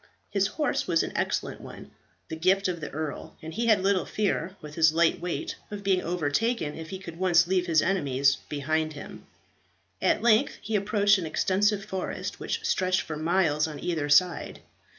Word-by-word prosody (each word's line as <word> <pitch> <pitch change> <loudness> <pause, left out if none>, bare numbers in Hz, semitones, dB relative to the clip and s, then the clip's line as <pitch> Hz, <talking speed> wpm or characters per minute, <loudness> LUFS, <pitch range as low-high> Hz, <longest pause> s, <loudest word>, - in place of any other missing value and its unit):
His 195 -1 +2
horse 295 +7 -1
was 165 -2 +2
an - - -4
excellent - - -2
one, - - -11 0.4
the 160 - -5
gift 190 +4 +2
of 175 -3 -3
the 150 - -5
earl, 155 0 -6
and 160 +1 -8
he 230 +6 -1
had 210 -4 +4
little 190 -5 +1
fear, 195 -3 -1
with 150 -1 -10
his 160 -1 +4
light 170 +1 +2
weight, 175 0 -3
of 205 -1 -7
being 190 -2 +2
overtaken, 175 +2 -1
if 160 -1 -8
he 190 - -5
could 170 -3 -10
once 175 -2 +4
leave 180 0 0
his 160 -2 +3
enemies 140 -7 +2
behind 155 +2 -1
him. 145 - -10 0.7
At - - +2
length 220 -2 +3
he 215 +1 -3
approached 205 0 +3
an 170 - -4
extensive 195 +5 +1
forest, 190 -1 -4
which 455 -1 -3
stretched 185 - +1
for 155 - -6
miles 155 -1 +1
on 150 -2 -7
either 155 -3 -2
side. 165 +3 +2
180 Hz, 185 wpm, -27 LUFS, 155-195 Hz, 0.7 s, had